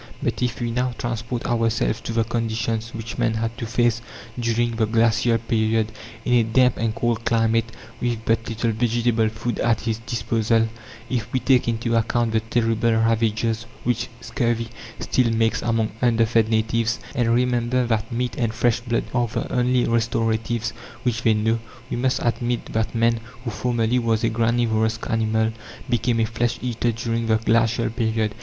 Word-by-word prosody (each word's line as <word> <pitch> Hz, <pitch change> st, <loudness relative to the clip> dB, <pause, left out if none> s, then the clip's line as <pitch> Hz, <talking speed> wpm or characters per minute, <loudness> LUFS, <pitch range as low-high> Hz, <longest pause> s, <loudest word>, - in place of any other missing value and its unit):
But -, -, -1 dB
if 125 Hz, -2 st, -1 dB
we 120 Hz, -1 st, -1 dB
now 125 Hz, +1 st, 0 dB
transport 120 Hz, +1 st, -3 dB
ourselves 115 Hz, -1 st, +1 dB
to 115 Hz, -, -5 dB
the 115 Hz, 0 st, +2 dB
conditions 115 Hz, 0 st, -2 dB
which 115 Hz, 0 st, -6 dB
man 110 Hz, -, +1 dB
had 115 Hz, +1 st, -2 dB
to 115 Hz, -, -3 dB
face 115 Hz, 0 st, +1 dB, 0.4 s
during 115 Hz, 0 st, 0 dB
the 110 Hz, -1 st, +1 dB
glacial 115 Hz, +1 st, +3 dB
period, 110 Hz, -1 st, 0 dB, 0.3 s
in 125 Hz, -, +1 dB
a 120 Hz, -, +6 dB
damp 125 Hz, +2 st, +3 dB
and 110 Hz, -1 st, -1 dB
cold 120 Hz, -1 st, 0 dB
climate, 115 Hz, -1 st, +2 dB, 0.3 s
with 120 Hz, -2 st, -2 dB
but 115 Hz, 0 st, +1 dB
little 115 Hz, +1 st, 0 dB
vegetable 115 Hz, 0 st, +1 dB
food 110 Hz, +1 st, -4 dB
at 115 Hz, -2 st, +2 dB
his 115 Hz, -1 st, -2 dB
disposal; 115 Hz, -1 st, +1 dB, 0.4 s
if 120 Hz, -2 st, -2 dB
we 130 Hz, -, +1 dB
take 130 Hz, -2 st, +3 dB
into 115 Hz, 0 st, 0 dB
account 115 Hz, 0 st, +1 dB
the 110 Hz, -, +2 dB
terrible 115 Hz, 0 st, +1 dB
ravages 115 Hz, 0 st, +1 dB, 0.2 s
which 120 Hz, 0 st, 0 dB
scurvy 115 Hz, 0 st, -1 dB, 0.3 s
still 125 Hz, -2 st, +1 dB
makes 115 Hz, 0 st, +1 dB
among 115 Hz, -2 st, 0 dB
underfed 115 Hz, -2 st, +3 dB
natives, 115 Hz, +1 st, +1 dB
and 120 Hz, -2 st, +1 dB
remember 125 Hz, 0 st, +1 dB
that 115 Hz, -1 st, -1 dB
meat 120 Hz, 0 st, -2 dB
and 115 Hz, -2 st, 0 dB
fresh 120 Hz, 0 st, +2 dB
blood 120 Hz, -1 st, -1 dB
are 120 Hz, -1 st, +2 dB
the 110 Hz, -, -4 dB
only 125 Hz, 0 st, +2 dB
restoratives 115 Hz, 0 st, 0 dB, 0.3 s
which 115 Hz, -3 st, 0 dB
they 110 Hz, -2 st, +3 dB
know, 110 Hz, +2 st, +1 dB, 0.3 s
we -, -, 0 dB
must 130 Hz, +2 st, +1 dB
admit 120 Hz, 0 st, -1 dB
that 110 Hz, +1 st, -1 dB
man, 115 Hz, 0 st, +2 dB, 0.2 s
who 120 Hz, -, -3 dB
formerly 120 Hz, +2 st, 0 dB
was 115 Hz, -1 st, 0 dB
a 115 Hz, -, +3 dB
granivorous 115 Hz, -1 st, +1 dB
animal, 110 Hz, 0 st, +1 dB, 0.4 s
became 120 Hz, 0 st, +1 dB
a 115 Hz, -, +3 dB
flesh 115 Hz, +2 st, -1 dB
eater 120 Hz, -1 st, 0 dB
during 115 Hz, 0 st, -2 dB
the 110 Hz, -1 st, +4 dB
glacial 115 Hz, +1 st, +2 dB
period. 110 Hz, -2 st, 0 dB
115 Hz, 170 wpm, -23 LUFS, 110-120 Hz, 0.4 s, a